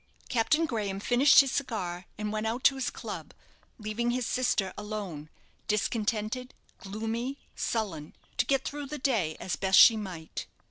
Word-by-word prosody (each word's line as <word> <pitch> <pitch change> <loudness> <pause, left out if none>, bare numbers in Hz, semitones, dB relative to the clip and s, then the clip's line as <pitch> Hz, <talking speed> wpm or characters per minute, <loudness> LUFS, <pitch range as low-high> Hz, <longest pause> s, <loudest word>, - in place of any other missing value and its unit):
Captain 305 +7 +2
Graham 210 -8 -2
finished 245 +8 +6
his 270 -2 -2
cigar, 185 -10 -3
and 210 0 -3
went 215 +1 -1
out 240 +4 -2
to 275 - +6
his 265 -2 -2
club, - - -7 0.4
leaving 220 +2 -2
his 245 0 0
sister 230 -7 0
alone, 200 -8 -5 0.4
discontented, 215 +3 -1 0.2
gloomy, 225 +6 -3 0.2
sullen, 185 -10 -3 0.2
to - - +2
get 270 -1 +2
through 290 0 -4
the 300 +2 -5
day 220 - 0
as 175 - -2
best 190 +3 +3
she 225 - +10
might. 185 -7 -6
220 Hz, 150 wpm, -29 LUFS, 195-255 Hz, 0.4 s, she